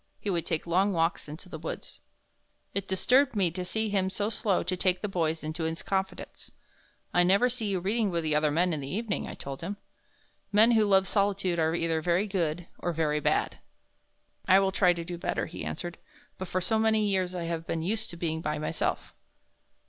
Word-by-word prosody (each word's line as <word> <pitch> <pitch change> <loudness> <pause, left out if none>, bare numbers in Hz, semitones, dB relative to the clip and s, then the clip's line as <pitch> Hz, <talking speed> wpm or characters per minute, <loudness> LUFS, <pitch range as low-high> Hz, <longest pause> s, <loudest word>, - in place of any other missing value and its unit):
He 205 - -2
would 170 -2 -1
take 160 -2 -1
long 190 +4 +2
walks 165 -2 0
into 160 +5 -9
the 160 -3 -7
woods. 160 - -7 0.7
It 200 - -2
disturbed 250 +8 +3
me 185 -5 +2
to 180 +2 -4
see 220 +4 -1
him 190 -2 +1
so 205 +3 -2
slow 205 -4 +1
to 185 +2 -1
take 185 0 +1
the - - +1
boys 165 -4 -1
into 155 +2 -3
his 160 -2 -3
confidence. 190 +2 -3 0.6
"I 175 - +5
never 200 +8 +4
see 230 -3 -2
you 195 -2 0
reading 210 +4 0
with 170 -2 -1
the 155 -1 0
other 150 0 +3
men 170 +4 +2
in 155 - -2
the 135 - -6
evening," 215 +3 -2
I - - -7
told 135 -1 -7
him. 200 +1 -4 0.7
"Men 215 +3 +6
who 220 -2 +4
love 190 -1 +4
solitude 195 -4 +1
are 160 0 +2
either 165 -1 0
very 175 +4 +2
good 175 -4 -1
or 175 - -2
very 150 -2 +1
bad." - - 0 0.9
"I 190 - +7
will 195 -1 +2
try 185 -1 +4
to 170 -1 -6
do 175 0 -6
better," 180 - -1
he 160 - -7
answered, 175 +1 -5 0.4
"but 185 - -4
for 185 - -1
so 220 +4 +1
many 220 -1 +3
years 185 -2 0
I 175 - -3
have 165 -1 -3
been 165 -1 -2
used 220 +4 -2
to 170 - -9
being 160 -1 -2
by 150 -1 -2
myself." 155 - -2
180 Hz, 210 wpm, -28 LUFS, 165-200 Hz, 0.9 s, I